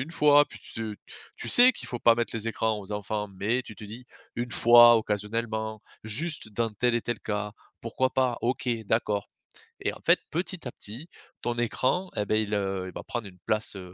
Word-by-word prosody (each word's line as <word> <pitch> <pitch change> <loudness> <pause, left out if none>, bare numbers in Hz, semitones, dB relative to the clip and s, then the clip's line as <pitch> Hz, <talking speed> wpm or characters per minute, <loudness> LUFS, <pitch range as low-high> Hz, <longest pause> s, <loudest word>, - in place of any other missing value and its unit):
une 145 +6 -5
fois 145 -2 +5
puis - - -13
tu - - -15 0.3
te - - -14 0.2
tu - - -5
sais 250 +1 +9
qu'il - - -9
faut 120 - -6
pas 115 0 +5
mettre 115 -2 -2
les 115 0 -2
écrans 110 -1 -1
aux 100 +1 -11
enfants 105 0 -3
mais 105 +6 -1
tu 110 - -12
te 105 - -10
dis: 115 +5 -9 0.3
«Une 120 +1 -4
fois, 120 0 +8
occasionnellement, 110 0 -3 0.2
juste 130 +4 +1
dans 115 +1 -1
tel 120 +3 0
et - - 0
tel 120 -3 -4
cas, 105 -1 -4 0.3
pourquoi 130 +3 -1
pas? 125 -2 0
OK, 125 +1 -2 0.2
d'accord.». 105 -2 -1 0.5
Et - - 0
en - - -12
fait - - +5
petit 175 -1 -3
à 125 - -4
petit 125 +11 -7 0.3
ton 120 -1 -2
écran 130 +10 -1
et 105 - 0
ben 110 +2 +1
il, 105 0 -4
heu, 95 -2 -2
il - - -10
va - - -7
prendre 120 -4 -5
une 90 -2 -15
place, 110 -1 0
heu, 90 -2 -9
115 Hz, 215 wpm, -27 LUFS, 105-125 Hz, 0.5 s, sais